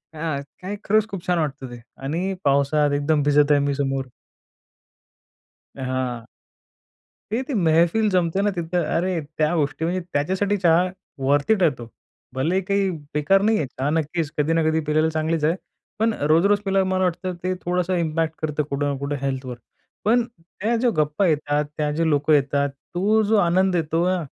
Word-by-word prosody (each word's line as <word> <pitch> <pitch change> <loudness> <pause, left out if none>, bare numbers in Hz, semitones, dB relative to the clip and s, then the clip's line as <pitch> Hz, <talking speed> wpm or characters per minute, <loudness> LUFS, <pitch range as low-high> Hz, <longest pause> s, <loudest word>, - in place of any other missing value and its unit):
हां. 155 -3 -2 0.2
काय 190 +3 -4
खरंच 215 +1 +2
खूप 190 -3 -7
छान 180 -1 +2
वाटतं 140 -3 -3
ते. 120 - -9 0.2
आणि 170 +8 -2
पावसात 140 +1 +2
एकदम 145 +1 +1
भिजत 145 0 +4
आहे 145 - +5
मी 140 - +1
समोर 135 -1 -1 1.7
हां. 130 -3 -3 1.1
ते 245 +4 0
ती 275 - -2
मेहफिल 170 +4 +3
जमते 180 0 +1
ना 205 - +2
तिथं, 175 -2 -2
अरे 175 +2 0 0.2
त्या 155 +2 +2
गोष्टी 145 +1 -1
म्हणजे 180 +2 -1
त्याच्यासाठी 190 +7 0
चहा 175 -1 +4 0.4
वर्थ 145 +4 +2
इट 195 -4 +1
आहे 165 - +5
तो. 120 - -8 0.5
भलेही 165 +9 +1
काही 200 0 +1 0.3
बेकार 150 +7 +3
नाही 220 +1 +3
आहे 150 - -1
चहा 130 +3 -3
नक्कीच 160 0 -1
कधी 150 +2 +2
ना 165 0 +2
कधी 160 0 +1
पिलेला 155 +1 +3
चांगलीच 160 0 -1
आहे, 160 +3 +3 0.4
पण 225 0 +2
अ, 145 - -4
रोज-रोज 195 +7 +4
पिल्यावर 195 -1 +2
मला 185 0 +1
वाटतं 180 +1 -2
ते 185 +1 0
थोडंसं 180 +1 0
इम्पॅक्ट 160 -1 -1
करतं 150 -1 0
कुठं 140 +1 -1
ना 140 - -3
कुठं 140 +1 -3
हेल्थवर. 130 -2 -3 0.5
पण 235 +3 +4
त्या 220 +3 -4
ज्या 240 +1 +2
गप्पा 150 +5 +1
येतात, 150 -2 +1
त्या 150 -1 0
जे 165 +2 0
लोकं 145 +1 +2
येतात, 140 0 +2 0.3
तो 210 +5 +3
जो 215 +1 +2
आनंद 185 0 +3
येतो 165 +1 0
ना 185 -1 0
165 Hz, 175 wpm, -23 LUFS, 145-185 Hz, 1.7 s, आहे